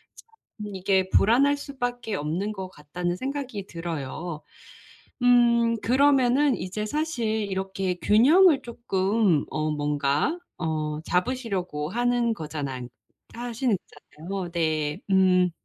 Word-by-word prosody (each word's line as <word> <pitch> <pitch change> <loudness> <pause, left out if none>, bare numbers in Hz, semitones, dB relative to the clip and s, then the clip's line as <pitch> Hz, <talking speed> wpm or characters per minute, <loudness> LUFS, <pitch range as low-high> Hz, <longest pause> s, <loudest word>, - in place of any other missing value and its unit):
참 215 - -11
이게 190 0 +1
'불안할 270 +9 +4
수밖에 245 -6 -4
없는 170 +8 -2
것 190 -2 -6
같다.'는 175 +2 -4
생각이 260 -6 -4
들어요. 165 -1 -5 0.8
음 235 -1 +4
그러면은 270 +1 +3
이제 210 +3 -4
사실 300 -3 -2
이렇게 195 -3 -2
균형을 290 - +5
쪼끔 200 -7 +1
어 155 0 -1
뭔가 145 - 0 0.2
어 155 -2 -2
잡으시려고 180 - -2
하는 240 +1 +1
거잖아 145 - -5 0.5
하시는 240 -2 -1 0.5
거잖아요. 190 -3 -3
네 155 -3 -1
음. 185 -2 +4
195 Hz, 235 characters per minute, -25 LUFS, 170-245 Hz, 0.8 s, 균형을